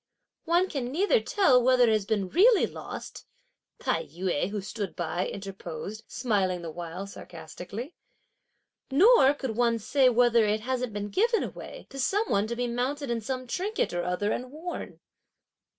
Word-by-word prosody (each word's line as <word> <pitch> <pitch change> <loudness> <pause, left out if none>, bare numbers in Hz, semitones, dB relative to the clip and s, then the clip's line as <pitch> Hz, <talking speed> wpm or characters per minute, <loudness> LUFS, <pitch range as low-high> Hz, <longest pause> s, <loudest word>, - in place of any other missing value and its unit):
"One 350 +2 +3
can 275 -8 -3
neither 405 - +3
tell 315 -12 +4
whether 250 0 +4
it 225 -2 +4
has 210 -2 0
been 205 -4 0
really 430 - +5
lost," - - -8 0.5
Tai - - -1
yü, 180 - -2
who 205 0 -3
stood 200 0 -5
by, 175 +1 -2
interposed, 195 +1 -7
smiling 195 -7 0
the 165 - -5
while 175 +3 -6
sarcastically; 205 - -8 1.0
"nor 290 - +6
could 265 -6 -4
one 235 0 +2
say 260 +4 +3
whether 240 -1 +4
it 215 0 +1
hasn't 250 0 -2
been 205 0 -4
given 455 - +2
away - - -8
to 275 - -8
some 410 - +1
one 200 +1 +2
to 235 - -3
be 245 +1 -1
mounted 250 +3 -2
in 230 -1 -1
some 255 +3 -4
trinket 380 - -2
or 175 0 -1
other 180 +4 -1
and 250 +1 -4
worn!" 330 +4 -7
235 Hz, 165 wpm, -28 LUFS, 200-275 Hz, 1.0 s, nor